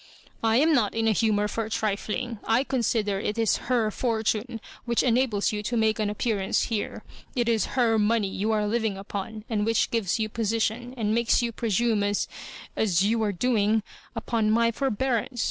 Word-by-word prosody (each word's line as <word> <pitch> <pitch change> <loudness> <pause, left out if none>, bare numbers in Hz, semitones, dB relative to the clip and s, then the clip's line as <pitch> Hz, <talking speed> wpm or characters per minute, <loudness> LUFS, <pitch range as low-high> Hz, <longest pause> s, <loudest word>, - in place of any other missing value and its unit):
"I 225 0 +3
am 315 +4 +4
not 225 -8 +2
in 225 0 +1
a - - +4
humour 210 -1 +2
for 220 +1 -3
trifiing. 220 +2 -2
I 230 +4 +2
consider 225 -6 0
it 210 +2 -3
is 225 -3 +2
her 230 -4 +2
fortune 225 0 -1 0.3
which 235 -1 +1
enables 240 -4 +2
you 210 -1 -3
to 235 +3 -2
make 220 0 +2
an 210 -1 0
appearance 210 -2 0
here. 210 - -3 0.3
It 240 -2 +1
is 225 -3 +2
Tier 230 -4 +3
money 210 0 +2
you 200 +3 -2
are 210 -1 +1
living 220 -2 -1
upon, 205 +2 -6
and 215 -3 0
which 225 +1 +1
gives 225 -6 0
you 220 -1 -1
position, 230 +3 -2
and 215 -2 0
makes 235 +1 +2
you 235 - -1
presume 225 -1 0
as 205 0 0 0.2
— - - -14
as 190 -4 +2
you 225 +3 +1
are 210 -2 +1
doing 215 +1 +1 0.2
— - - -28
upqn 225 -1 0
my 230 +1 +3
forbearance. 250 -1 -1
220 Hz, 190 wpm, -26 LUFS, 210-235 Hz, 0.3 s, am